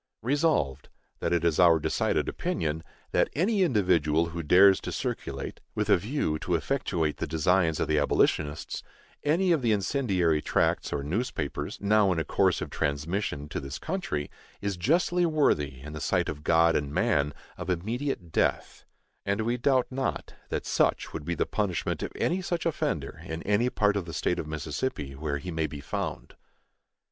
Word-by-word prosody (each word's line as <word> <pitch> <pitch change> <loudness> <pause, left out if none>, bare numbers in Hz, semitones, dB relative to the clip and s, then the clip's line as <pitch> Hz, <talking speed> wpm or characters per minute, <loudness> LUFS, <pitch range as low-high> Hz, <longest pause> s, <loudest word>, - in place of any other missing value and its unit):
Resolved, 125 - +1 0.3
That 85 - -1
it 85 -1 +1
is 80 -3 +2
our 85 -2 +7
decided 75 - 0
opinion 80 0 -2 0.3
that - - +2
any 195 +7 +2
individual 85 - +2
who 85 0 -4
dares 95 +5 +6
to - - -5
circulate, - - -4 0.2
with - - 0
a - - +7
view 100 - -1
to 90 - 0
effectuate 85 - -1
the - - -3
designs 80 +1 +2
of - - 0
the 75 -1 +2
abolitionists, 75 +1 +1 0.4
any 175 +5 +2
of 160 -4 +3
the 115 -2 +2
incendiary 95 - +1
tracts - - +1
or 70 - -2
newspapers 80 - -3
now 100 -1 +3
in 90 - 0
a 80 - +1
course - - +2
of - - -5
transmission 75 +1 -2
to - - -3
this 70 +1 -6
country, 160 - -3 0.3
is 100 -1 -2
justly 175 - +2
worthy, 75 - +1
in 75 +2 -8
the 75 - -6
sight - - +1
of 75 0 -6
God 85 +1 +4
and 70 -1 -1
man, 75 0 +1 0.2
of - - -6
immediate 105 - -2
death; - - 0 0.4
and 100 +2 0
we 120 +2 0
doubt 130 +1 +2
not 135 +1 -3 0.2
that - - -2
such - - +1
would 75 -2 -5
be 85 - -1
the - - +1
punishment 100 -5 -1
of - - -3
any 180 +3 0
such 175 -2 -2
offender 165 - -2
in 80 +1 -5
any 105 +5 +2
part 105 -4 +2
of 100 -4 -1
the 85 - -7
State 90 - 0
of 75 - -4
Mississippi 75 - -3
where 70 +1 -3
he 90 +6 -6
may 80 -1 0
be 75 -1 -8
found. 70 - -4
85 Hz, 175 wpm, -28 LUFS, 75-120 Hz, 0.4 s, our